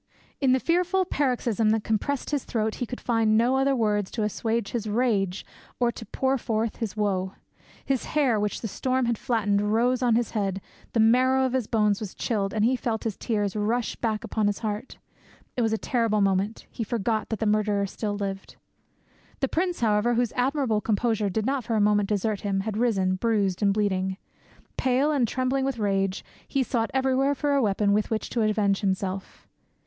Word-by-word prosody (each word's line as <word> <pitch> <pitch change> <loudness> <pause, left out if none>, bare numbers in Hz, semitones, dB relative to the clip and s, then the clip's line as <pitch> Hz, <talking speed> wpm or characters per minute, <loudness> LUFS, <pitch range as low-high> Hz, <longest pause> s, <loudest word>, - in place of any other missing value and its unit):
In 270 -3 +3
the 260 - +4
fearful 360 +5 +1
paroxysm 245 - 0
that 220 0 +1
compressed 245 +7 -1
his 290 -3 0
throat 220 -2 -1
he 245 - -1
could 250 - -6
find 225 -2 +2
no 240 +3 +3
other 270 +1 +2
words 210 -4 +1
to 220 - -2
assuage 225 +1 -1
his 220 -3 -3
rage 205 -5 0 0.3
or 240 -1 +2
to 225 - -10
pour 265 0 0
forth 225 -1 -1
his 220 -3 -4
woe. 190 -2 0 0.5
His 270 -3 0
hair, 255 -7 +3
which 205 0 -2
the 225 - -3
storm 255 +4 0
had 235 -2 -1
flattened, 205 -4 +1
rose 235 +5 +1
on 240 -3 +3
his 235 -1 0
head, 195 -3 -1 0.3
the 230 - +1
marrow 255 +4 +4
of 255 - -1
his 255 -5 0
bones 210 -3 +2
was 210 -4 -6
chilled, 200 -4 -1
and 215 -1 +1
he 255 +3 +3
felt 230 -3 -2
his 220 -4 -2
tears 205 -3 -1
rush 220 +3 0
back 220 -3 -2
upon 215 -2 0
his 205 - 0
heart. 210 +4 -4 0.6
It 250 - 0
was 225 -1 +1
a 220 - +1
terrible 230 -2 0
moment; 195 +2 0
he 230 - -4
forgot 220 0 -1
that 220 - -2
the 220 - -2
murderer 210 -1 +2
still 205 +1 -3
lived. 195 -1 -5 0.8
The 270 - +1
prince, 350 +3 -1
however, 225 +1 +2
whose 240 -1 +1
admirable 255 -4 +1
composure 220 -1 0
did 215 +3 -1
not 270 0 0
for 230 0 -2
a - - +2
moment 205 -1 +3
desert 210 0 0
him, 195 -2 -1
had 210 +1 -4
risen, 195 -5 +1
bruised 200 -3 0
and 200 -1 +4
bleeding. 190 -2 0 0.6
Pale 265 +4 +2
and 270 -6 +2
trembling 255 +3 0
with 270 -2 -1
rage, 195 -2 0 0.2
he 275 - +1
sought 235 -3 -1
everywhere 265 +1 +2
for 290 +1 0
a 280 - +3
weapon 200 -2 +2
with 210 +1 +1
which 220 -1 -2
to 235 - 0
avenge 210 -2 +2
himself. 190 -1 -3
220 Hz, 195 wpm, -26 LUFS, 205-250 Hz, 0.8 s, the